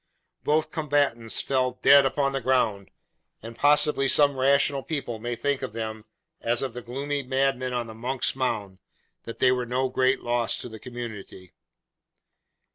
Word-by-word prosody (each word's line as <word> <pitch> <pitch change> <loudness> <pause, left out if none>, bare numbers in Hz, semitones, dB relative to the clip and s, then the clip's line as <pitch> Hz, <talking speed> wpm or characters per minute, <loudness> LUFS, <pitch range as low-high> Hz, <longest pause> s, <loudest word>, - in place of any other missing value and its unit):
Both 155 +1 +1
combatants 140 -7 0
fell 130 -2 -1
dead 140 -1 +7
upon 140 +1 0
the 135 - -2
ground; 115 -6 0 0.5
and 115 +1 -8
possibly 145 0 +3
some 140 +1 +4
rational 140 +1 +2
people 135 -7 -4
may 120 +2 -3
think 140 +4 -1
of 130 -5 -5
them, 110 -1 -5 0.4
as 120 +2 0
of 130 -4 -4
the 125 - -6
gloomy 140 +4 -3
madmen 130 -1 0
on 120 -1 -2
the 110 - -9
Monks' 125 +4 -2
Mound, 105 -7 -3 0.5
that 115 - -7
they 130 - +4
were 125 -1 -1
no 130 +2 0
great 130 +1 +1
loss 120 -1 0
to 125 - -7
the 110 -1 -10
community. 110 -7 -9
130 Hz, 160 wpm, -25 LUFS, 115-135 Hz, 0.5 s, dead